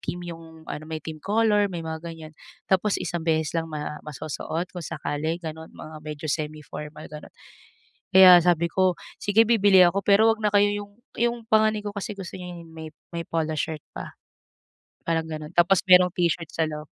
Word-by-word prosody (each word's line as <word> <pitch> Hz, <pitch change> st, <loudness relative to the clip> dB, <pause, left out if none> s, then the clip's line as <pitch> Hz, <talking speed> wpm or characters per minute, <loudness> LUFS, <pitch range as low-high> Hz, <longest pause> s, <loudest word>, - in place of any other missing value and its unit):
theme 175 Hz, 0 st, -5 dB
yung 160 Hz, -1 st, -13 dB
ano, 155 Hz, -1 st, -7 dB
may 160 Hz, -, -4 dB
theme 155 Hz, -1 st, -7 dB
color, 210 Hz, +1 st, +2 dB
may 170 Hz, -3 st, -6 dB
mga 160 Hz, 0 st, -5 dB
ganyan. 160 Hz, -1 st, -10 dB, 0.3 s
Tapos 195 Hz, +2 st, +1 dB
isang 175 Hz, -, -3 dB
beses 160 Hz, -1 st, 0 dB
lang 165 Hz, -1 st, -2 dB
ma 150 Hz, 0 st, -5 dB
masusuot 155 Hz, +3 st, -5 dB
kung 180 Hz, -, -7 dB
sakali, 150 Hz, +4 st, -3 dB
gano'n, 160 Hz, 0 st, -7 dB
mga 155 Hz, 0 st, -10 dB
medyo 150 Hz, 0 st, -6 dB
semi-formal, 150 Hz, 0 st, -6 dB
ganun. 150 Hz, 0 st, -10 dB, 0.8 s
Kaya 185 Hz, -1 st, +10 dB
sabi 170 Hz, -1 st, +3 dB
ko, 185 Hz, 0 st, +2 dB, 0.3 s
sige 205 Hz, +2 st, +4 dB
bibili 205 Hz, -5 st, +5 dB
ako 195 Hz, +3 st, +1 dB
pero 205 Hz, +2 st, +5 dB
wag 225 Hz, -, +2 dB
na 210 Hz, -, +2 dB
kayo 205 Hz, 0 st, +5 dB
yung 205 Hz, 0 st, -6 dB, 0.3 s
yung 240 Hz, 0 st, +1 dB
panganay 215 Hz, 0 st, +3 dB
ko 205 Hz, -, -4 dB
kasi 200 Hz, +2 st, -4 dB
gusto 195 Hz, -3 st, -8 dB
niya 180 Hz, -1 st, -8 dB, 0.6 s
may 170 Hz, -, -3 dB
polo 160 Hz, -1 st, -2 dB
shirt 155 Hz, 0 st, -3 dB
pa, -, -, -7 dB, 0.9 s
parang 165 Hz, -1 st, -1 dB
ganun. 155 Hz, 0 st, -6 dB
Tapos 175 Hz, +2 st, +4 dB
merong 180 Hz, -1 st, +7 dB
t-shirt 170 Hz, -2 st, 0 dB
sa 160 Hz, -, +1 dB
loob. 150 Hz, -1 st, -7 dB
170 Hz, 175 wpm, -25 LUFS, 155-195 Hz, 0.9 s, Kaya